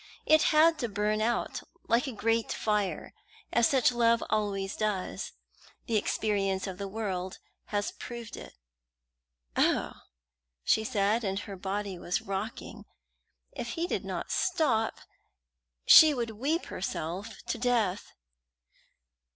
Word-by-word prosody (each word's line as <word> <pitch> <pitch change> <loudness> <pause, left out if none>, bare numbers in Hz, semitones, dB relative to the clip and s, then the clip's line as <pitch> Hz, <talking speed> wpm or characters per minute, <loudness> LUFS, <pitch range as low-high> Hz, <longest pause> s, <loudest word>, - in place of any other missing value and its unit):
It 310 0 +6
had 320 +1 +5
to 240 - -1
burn 210 +1 0
out, 235 +2 -1 0.3
like 240 +5 +2
a - - -3
great 225 0 0
fire, 210 -3 -1 0.4
as 235 -1 +5
such 260 -3 +4
love 235 -1 +3
always 200 -2 -1
does. 210 -4 -2 0.5
The 230 - -1
experience 200 -2 0
of 190 -1 -6
the 200 - -3
world 190 -3 -4 0.3
has 205 0 -2
proved 235 -2 -8
it." - - -11 1.0
"Oh!" - - +2 0.7
she 220 - +2
cried, 215 0 +1
and 195 -1 -1
her 200 - -7
body 195 0 -4
was 175 - -1
rocking. 195 +3 -5 0.7
If 235 - -5
he 335 - -1
did - - -2
not - - -4
stop, 305 -12 +1 0.8
she 310 -2 +9
would 235 -2 -2
weep 280 - -1
herself 190 +4 -4
to - - -3
death. 225 -6 +1
215 Hz, 125 wpm, -29 LUFS, 195-235 Hz, 1.0 s, she